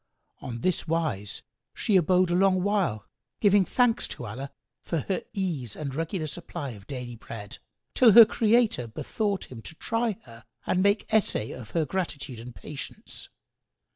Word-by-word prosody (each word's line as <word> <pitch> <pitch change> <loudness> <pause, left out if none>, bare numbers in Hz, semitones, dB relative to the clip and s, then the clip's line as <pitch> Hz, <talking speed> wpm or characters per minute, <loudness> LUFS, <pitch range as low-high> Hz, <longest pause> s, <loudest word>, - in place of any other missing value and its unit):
On 120 -2 -6
this 185 -2 0
wise 155 -12 -1 0.3
she 210 - +1
abode 180 0 +4
a - - +3
long 185 0 +3
while, 195 - +1
still 100 - -36 0.3
giving 200 -2 +5
thanks 245 +1 +2
to 125 - -7
Allah 130 +6 -6 0.3
for 165 -3 -2
her 190 - -2
ease 160 - -3
and 140 -3 -4
regular 165 +3 -2
supply 155 -2 -5
of 100 -3 -12
daily 125 -3 -6
bread, 110 -2 -9 0.3
till 235 -5 +6
her 230 +1 +12
Creator 220 - +2
bethought 200 - -3
Him 120 -3 -8
to 160 - -9
try 225 +2 -1
her 115 -2 -14 0.2
and 185 - +2
make 200 +2 +3
essay 205 - +2
of 120 -3 -8
her 160 - +3
gratitude 140 -7 -4
and 120 +1 -9
patience. 150 -2 -8
165 Hz, 165 wpm, -27 LUFS, 125-195 Hz, 0.3 s, her